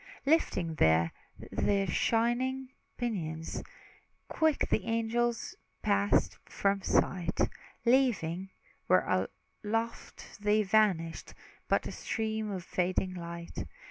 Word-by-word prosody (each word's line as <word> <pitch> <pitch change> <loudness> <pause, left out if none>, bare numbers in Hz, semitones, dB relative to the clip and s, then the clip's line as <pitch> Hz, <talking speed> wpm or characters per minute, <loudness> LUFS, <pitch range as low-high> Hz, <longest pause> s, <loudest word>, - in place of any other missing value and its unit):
Lifting 230 - +2
then 80 - +4 0.4
their 200 -1 +2
shining 240 +7 +1 0.3
pinions, 165 -10 -3 0.7
Quick 315 -2 +2
the 215 - +2
angels 230 +1 0 0.3
passed 200 -1 +2
from 195 0 0
sight; 175 -2 +1 0.5
Leaving, 205 -8 +2 0.4
where - - +3 0.3
aloft 225 0 -4
they 210 +1 +3
vanished, 190 -6 +1 0.3
But - - +2
a - - -4
stream 220 -1 -2
of 190 -3 -4
fading 185 +1 0
light. 170 -1 -6
205 Hz, 95 wpm, -31 LUFS, 175-230 Hz, 0.7 s, then